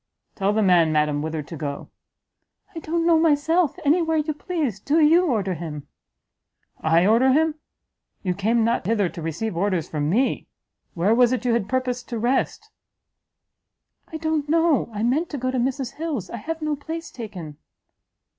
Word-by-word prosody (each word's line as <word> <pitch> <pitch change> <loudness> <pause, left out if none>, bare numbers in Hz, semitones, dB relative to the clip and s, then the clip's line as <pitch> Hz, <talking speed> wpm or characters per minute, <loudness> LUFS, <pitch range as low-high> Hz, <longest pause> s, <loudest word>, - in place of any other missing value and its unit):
"Tell 195 0 0
the 215 +1 +1
man, 175 -4 +4
madam, 150 -1 +1
whither 155 0 -3
to 165 - -9
go." 145 -2 -6 0.8
"I - - -4
don't 330 +1 -1
know 335 -1 +5
myself 320 +1 +2
any 315 +5 +4
where 320 -1 0
you 305 0 0
please 295 - -3
do 290 +10 +1
you 330 +4 +5
order 205 - 0
him." 155 -4 -7 0.9
"I 165 +3 +3
order 240 +5 +4
him! 315 +2 +2 0.7
you 180 -2 0
came 220 +5 +1
not 230 +2 +1
hither 205 -5 +1
to 170 - -9
receive 165 +6 -3
orders 185 -2 0
from 150 -1 -2
me! 245 +9 0 0.5
where 185 +6 +2
was 245 +1 +4
it 255 0 -2
you 240 - +2
had 215 -3 -1
purposed 250 -1 -2
to 235 - -3
rest?" 260 - -1 1.4
"I 320 - -6
don't 315 -2 -1
know 325 -5 +2
I 210 0 -3
meant 290 +9 +1
to 290 - -4
go 255 0 -1
to 260 - -1
Mrs 260 0 -2
Hill's 305 - -4
I - - -5
have 320 +8 -5
no 305 -1 0
place 325 +3 -7
taken." 180 - -8
240 Hz, 175 wpm, -23 LUFS, 185-310 Hz, 1.4 s, know